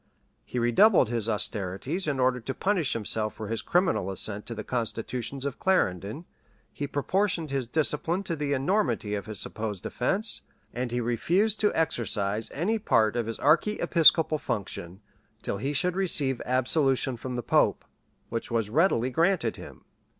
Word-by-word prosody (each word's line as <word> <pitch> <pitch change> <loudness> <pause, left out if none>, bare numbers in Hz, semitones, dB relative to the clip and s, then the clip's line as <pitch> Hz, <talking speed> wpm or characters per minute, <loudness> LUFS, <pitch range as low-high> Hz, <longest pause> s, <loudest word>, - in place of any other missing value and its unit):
He - - -7
redoubled 125 - +4
his 115 -2 -1
austerities 105 - -1
in 140 -3 -1
order 125 0 +2
to 130 +3 -5
punish 190 -8 0
himself 110 -1 -1
for 110 -2 -7
his 115 - -2
criminal 175 - +1
assent 100 +2 -3
to 115 - -5
the - - -5
constitutions 125 +2 -3
of 140 -2 -4
Clarendon: 110 - 0 0.5
he 145 - -4
proportioned 170 +3 -1
his 135 -3 -1
discipline 160 +6 0
to 170 - -3
the 145 -2 -2
enormity 140 - 0
of 100 0 -4
his 105 -3 -5
supposed 105 -4 -5
offence: 195 - -1 0.3
and 125 0 -3
he 120 - -1
refused 180 - +1
to 210 - +2
exercise 110 -8 0
any 210 +9 -1
part 110 - +2
of 120 -2 -1
his 115 - -4
archiepiscopal 165 -3 +4
function, 95 -5 -5 0.4
till - - -2
he 135 +8 -2
should 180 +5 +1
receive 150 -9 +3
absolution 130 +1 +1
from 125 +2 -6
the 120 - -3
pope, - - +2 0.4
which 115 - -4
was 115 -3 -1
readily 130 -5 +2
granted 165 - +1
him. - - -12
130 Hz, 155 wpm, -27 LUFS, 115-165 Hz, 0.5 s, redoubled